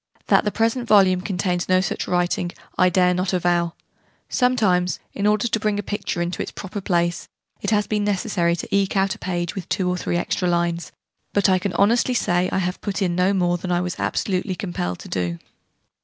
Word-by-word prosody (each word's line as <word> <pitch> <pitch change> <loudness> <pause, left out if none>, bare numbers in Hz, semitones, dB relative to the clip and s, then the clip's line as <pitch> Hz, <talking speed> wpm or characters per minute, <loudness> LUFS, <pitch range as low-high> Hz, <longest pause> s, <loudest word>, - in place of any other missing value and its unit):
That - - +4
the 210 - +1
present 230 +3 0
volume 190 -4 +5
contains 180 -2 -1
no 185 0 +5
such 185 - -2
writing 175 0 0 0.2
I 185 -1 +4
dare 180 0 +3
not 185 +1 -1
avow: 175 -1 +1 0.5
sometimes, 205 -8 +2
in 200 - 0
order 210 +2 +2
to 225 - 0
bring 210 -1 0
a 205 - -2
picture 200 -4 -2
into 175 +1 -3
its - - -3
proper 200 +1 -6
place, 175 -3 0 0.3
it 200 - -1
has 210 -1 +2
been 210 0 -1
necessary 190 -4 +1
to 175 - -3
eke 200 0 +1
out 195 0 +2
a - - -12
page 175 -1 -2
with 190 -4 -7
two 185 - 0
or 180 0 0
three 175 - -1
extra 180 +1 -1
lines: 170 0 -1 0.4
but 200 -1 +3
I 185 -1 +4
can 185 0 -3
honestly 235 +7 +3
say 175 -4 +1
I - - 0
have 180 -1 -2
put 200 -1 -2
in 175 -2 0
no 180 +2 +3
more 175 -2 +1
than 180 +1 -4
I 175 0 +2
was 180 -1 -4
absolutely 185 0 -1
compelled 130 - -3
to - - -10
do. 90 -2 -2
185 Hz, 210 wpm, -22 LUFS, 175-205 Hz, 0.5 s, volume